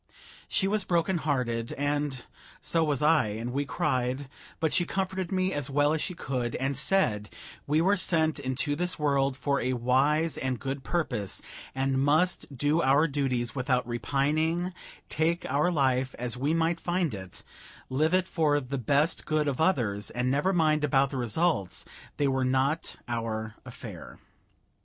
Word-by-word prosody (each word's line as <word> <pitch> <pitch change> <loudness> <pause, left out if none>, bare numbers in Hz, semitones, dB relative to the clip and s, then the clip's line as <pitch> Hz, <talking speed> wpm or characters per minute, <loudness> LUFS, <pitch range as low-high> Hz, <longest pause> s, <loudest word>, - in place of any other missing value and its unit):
She 195 - +1
was 210 0 +1
broken 175 0 +1
hearted, 125 -6 -1
and 145 -2 -2 0.3
so 165 -1 +1
was 150 -2 0
I, 150 -5 +4
and 115 +4 -4
we 140 +2 0
cried; 130 0 -1 0.3
but 160 -2 0
she 175 - +3
comforted 190 0 -2
me 185 0 +1
as 145 -1 -2
well 145 +2 +3
as 160 - -1
she 180 - -3
could, 125 -7 -3
and 135 +1 -1
said 120 - +1 0.4
we 150 +2 +3
were 195 +4 +4
sent 160 -5 +1
into 135 +2 -1
this 180 +3 0
world 140 -3 +1
for 140 +1 0
a 130 +1 0
wise 140 +6 +2
and 130 -2 -2
good 135 0 -4
purpose, 125 - -1 0.4
and 135 0 +1
must 155 +4 +2
do 145 +5 +1
our 140 +3 +4
duties 130 -5 -1
without 125 -2 0
repining, 155 +8 0 0.3
take 165 +3 0
our 145 +6 +1
life 130 -4 +1
as 120 0 -3
we 140 +5 0
might 165 +1 +1
find 175 -5 0
it, 95 -2 -8 0.4
live 155 +7 +2
it 185 0 +1
for 150 -5 +2
the 135 0 -4
best 145 +7 +2
good 155 -1 +1
of 140 +1 -1
others, 110 - +1
and 125 +1 -1
never 145 +8 +2
mind 155 -4 +2
about 135 -1 +3
the 135 - -3
results; 125 - 0 0.3
they 145 - +2
were 130 -1 +1
not 135 +5 +1
our 110 -2 -3
affair. - - -9
145 Hz, 165 wpm, -28 LUFS, 130-160 Hz, 0.4 s, I